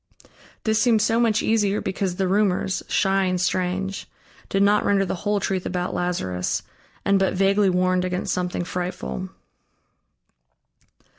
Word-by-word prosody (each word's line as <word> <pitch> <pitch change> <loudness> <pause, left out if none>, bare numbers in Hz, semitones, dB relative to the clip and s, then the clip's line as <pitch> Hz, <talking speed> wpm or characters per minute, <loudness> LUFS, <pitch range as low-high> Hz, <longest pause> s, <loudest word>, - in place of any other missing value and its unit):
This 220 0 +2
seemed 230 -2 +4
so 225 +2 +2
much 225 -3 +2
easier 210 -2 +2
because 190 -1 -2
the 190 0 0
rumors, 190 -1 +1
shy 195 0 +2
and 185 -1 0
strange, 185 +2 -1 0.4
did 195 0 +2
not 205 +1 +4
render 195 -1 +2
the - - -2
whole 205 +2 -1
truth 190 -2 -1
about 180 0 -3
Lazarus 95 - -2 0.4
and 200 0 +3
but 190 0 +1
vaguely 195 +1 +3
warned 185 0 +1
against 180 0 -2
something 180 -1 -2
frightful. 170 - -4
190 Hz, 140 wpm, -23 LUFS, 180-205 Hz, 0.4 s, seemed